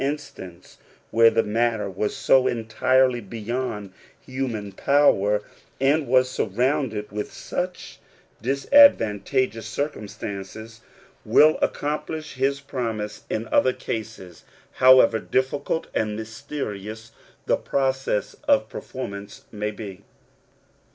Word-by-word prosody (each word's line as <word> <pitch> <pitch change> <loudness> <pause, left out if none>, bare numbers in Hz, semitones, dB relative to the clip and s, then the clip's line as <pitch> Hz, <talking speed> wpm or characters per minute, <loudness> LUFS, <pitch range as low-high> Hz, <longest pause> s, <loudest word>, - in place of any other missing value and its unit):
instance, 115 - -6 0.3
where 115 0 +6
the 115 0 +1
matter 115 -1 0
was 100 +2 -3
so 130 -1 +4
entirely 125 +2 +2
beyond 110 -1 -4 0.3
human 125 -6 -4
power, 105 -4 +3 0.4
and 140 +3 +2
was 130 +1 +4
surrounded 125 -2 -1
with 105 0 -4
such 180 0 -5 0.4
dis 135 +4 -2
advantageous 115 - +4
circumstances, 110 -3 -6 0.4
will 150 +7 +5
accomplish 155 +1 -2
his 135 +1 0
promise 110 -6 -4
in 110 +1 -2
other 130 - +3
cases, 110 -6 -6 0.3
however 130 -3 +6
difficult 140 +6 -1
and 105 -1 -1
mysterious 110 -1 -6 0.3
the - - +3
process 135 -5 -1
of 285 -1 +4
performance 100 -5 -7
may 105 -1 -3
be. 100 -3 -8
115 Hz, 100 wpm, -24 LUFS, 105-135 Hz, 0.4 s, where